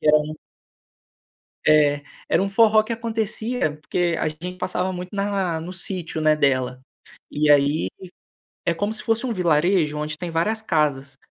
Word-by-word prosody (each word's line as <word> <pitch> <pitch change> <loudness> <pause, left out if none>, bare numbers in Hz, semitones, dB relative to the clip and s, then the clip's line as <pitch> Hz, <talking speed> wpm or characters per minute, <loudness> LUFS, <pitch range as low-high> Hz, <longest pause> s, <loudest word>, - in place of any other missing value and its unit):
que - - -4
era 150 - +7 1.5
É. 145 -1 +4 0.3
Era - - +3
um 195 - 0
forró 215 +1 +5
que 230 +2 -3
acontecia 225 -4 -2
porque 175 -1 0
a - - 0
gente 170 +4 -6
passava 185 0 -2
muito 180 0 -6
na 195 -4 -1
no 175 +3 -7
sítio, 175 -3 -3
né, 155 0 +4
dela. 130 -3 +1 0.5
E 150 0 +1
aí, 145 -7 +4 0.8
é 170 - +1
como 205 +5 -1
se 220 - -3
fosse 225 +2 0
um 245 - -1
vilarejo 170 -3 +2
onde 150 0 -4
tem 175 - -4
várias 170 +7 0
casas. 145 -6 0
175 Hz, 160 wpm, -23 LUFS, 150-200 Hz, 1.5 s, era